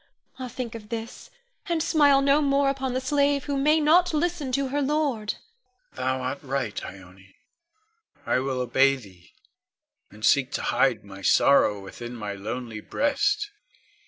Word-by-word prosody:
Ah, 255 Hz, -, -4 dB
think 250 Hz, -1 st, -6 dB
of 215 Hz, -2 st, -10 dB
this, 230 Hz, 0 st, -7 dB, 0.4 s
and 330 Hz, -2 st, +1 dB
smile 285 Hz, -4 st, +4 dB
no 280 Hz, +2 st, +4 dB
more 275 Hz, -1 st, +2 dB
upon 265 Hz, -2 st, -3 dB
the -, -, +1 dB
slave 280 Hz, +1 st, +1 dB
who 285 Hz, -, -3 dB
may 300 Hz, +3 st, +3 dB
not 330 Hz, +3 st, +4 dB
listen 320 Hz, -4 st, -1 dB
to 275 Hz, +1 st, 0 dB
her 290 Hz, +2 st, -1 dB
lord. 275 Hz, -7 st, -1 dB, 0.6 s
Con. -, -, -6 dB
Thou 130 Hz, 0 st, 0 dB
art 130 Hz, +2 st, -3 dB
right, 135 Hz, -6 st, -3 dB
Ione. 95 Hz, 0 st, -12 dB, 0.9 s
I -, -, +1 dB
will 130 Hz, -1 st, -2 dB
obey 135 Hz, +3 st, +3 dB
thee, 95 Hz, -8 st, -15 dB, 0.8 s
and 105 Hz, +1 st, -6 dB
seek 140 Hz, -1 st, +3 dB
to -, -, -2 dB
hide 120 Hz, -5 st, +1 dB
my 100 Hz, -1 st, -11 dB
sorrow 105 Hz, 0 st, +4 dB
within 120 Hz, +5 st, -9 dB
my 105 Hz, -3 st, -5 dB
lonely 110 Hz, +3 st, -6 dB
breast. 410 Hz, -, 0 dB
230 Hz, 160 wpm, -25 LUFS, -, 0.9 s, smile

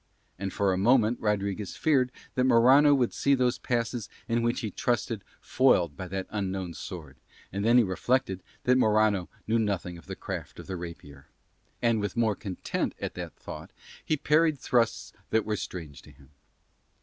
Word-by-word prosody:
And 95 Hz, 0 st, -3 dB
for 100 Hz, -2 st, +1 dB
a 90 Hz, -, -1 dB
moment 120 Hz, +2 st, +4 dB
Rodriguez 100 Hz, -1 st, -2 dB
feared 130 Hz, -5 st, +2 dB, 0.2 s
that 125 Hz, -, +1 dB
Morano 130 Hz, +4 st, +6 dB
would 125 Hz, -4 st, +1 dB
see 140 Hz, 0 st, +3 dB
those 125 Hz, -1 st, +1 dB
passes 120 Hz, -2 st, -2 dB, 0.2 s
in 115 Hz, 0 st, +1 dB
which 120 Hz, +1 st, 0 dB
he 110 Hz, -4 st, -3 dB
trusted 115 Hz, -1 st, -1 dB, 0.2 s
foiled 90 Hz, -, +3 dB
by 95 Hz, -, -6 dB
that 95 Hz, +1 st, -3 dB
unknown 95 Hz, -4 st, -3 dB
sword, 75 Hz, -9 st, -8 dB, 0.4 s
and 100 Hz, +1 st, -2 dB
then 115 Hz, +3 st, +5 dB
he 120 Hz, -, +7 dB
reflected 95 Hz, +1 st, 0 dB, 0.2 s
that 125 Hz, +1 st, +4 dB
Morano 110 Hz, -5 st, +3 dB, 0.2 s
knew 115 Hz, +1 st, +2 dB
nothing 95 Hz, -5 st, -2 dB
of -, -, -18 dB
the -, -, -5 dB
craft -, -, -6 dB
of -, -, -9 dB
the 95 Hz, -, -5 dB
rapier, 85 Hz, -5 st, -9 dB, 0.6 s
and 115 Hz, -2 st, +3 dB
with 105 Hz, +1 st, -3 dB
more 110 Hz, -3 st, +2 dB
content 95 Hz, -3 st, -3 dB
at -, -, -4 dB
that -, -, -7 dB
thought -, -, -9 dB, 0.3 s
he 155 Hz, -, 0 dB
parried 155 Hz, +1 st, +3 dB
thrusts 120 Hz, -4 st, 0 dB, 0.2 s
that 110 Hz, -1 st, +1 dB
were 110 Hz, -, -1 dB
strange 80 Hz, -8 st, -7 dB
to -, -, -16 dB
him. 70 Hz, 0 st, -19 dB
110 Hz, 175 wpm, -28 LUFS, 95-125 Hz, 0.6 s, he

